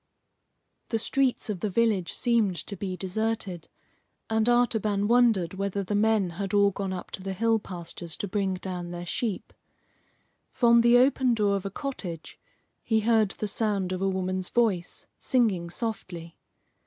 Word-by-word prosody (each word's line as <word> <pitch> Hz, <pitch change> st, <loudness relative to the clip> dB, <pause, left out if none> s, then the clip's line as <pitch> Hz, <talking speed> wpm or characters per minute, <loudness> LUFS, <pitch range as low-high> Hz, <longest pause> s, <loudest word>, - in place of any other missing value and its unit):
The 225 Hz, -, +1 dB
streets 260 Hz, +3 st, 0 dB
of 210 Hz, -4 st, -3 dB
the 210 Hz, -, -1 dB
village 205 Hz, -4 st, +1 dB
seemed 230 Hz, -6 st, +2 dB
to 200 Hz, -, -6 dB
be 185 Hz, -1 st, -4 dB
deserted, 195 Hz, -3 st, -3 dB, 0.6 s
and 220 Hz, +1 st, +2 dB
Artaban 220 Hz, -4 st, +2 dB
wondered 225 Hz, -7 st, +3 dB
whether 200 Hz, +1 st, -2 dB
the 195 Hz, -, -4 dB
men 205 Hz, -3 st, +2 dB
had 195 Hz, +3 st, -3 dB
all 200 Hz, 0 st, +5 dB
gone 195 Hz, 0 st, -4 dB
up 185 Hz, -1 st, -6 dB
to -, -, -5 dB
the 190 Hz, 0 st, -4 dB
hill 225 Hz, +3 st, +2 dB
pastures 170 Hz, -3 st, -6 dB
to 205 Hz, -, -3 dB
bring 195 Hz, -1 st, -1 dB
down 180 Hz, -2 st, -5 dB
their 175 Hz, 0 st, -6 dB
sheep. 210 Hz, +3 st, -3 dB, 1.0 s
From 235 Hz, -1 st, +5 dB
the 235 Hz, +1 st, +6 dB
open 255 Hz, -1 st, +3 dB
door 205 Hz, -2 st, +2 dB
of 195 Hz, 0 st, -3 dB
a -, -, -4 dB
cottage 195 Hz, -, -6 dB, 0.4 s
he 220 Hz, -1 st, +1 dB
heard 220 Hz, -2 st, +3 dB
the 210 Hz, -, -4 dB
sound 205 Hz, -3 st, -1 dB
of 185 Hz, 0 st, -3 dB
a 195 Hz, -, +2 dB
woman's 185 Hz, -1 st, -2 dB
voice 205 Hz, -8 st, 0 dB
singing 205 Hz, -9 st, +1 dB
softly. 175 Hz, -5 st, -5 dB
200 Hz, 160 wpm, -27 LUFS, 185-225 Hz, 1.0 s, the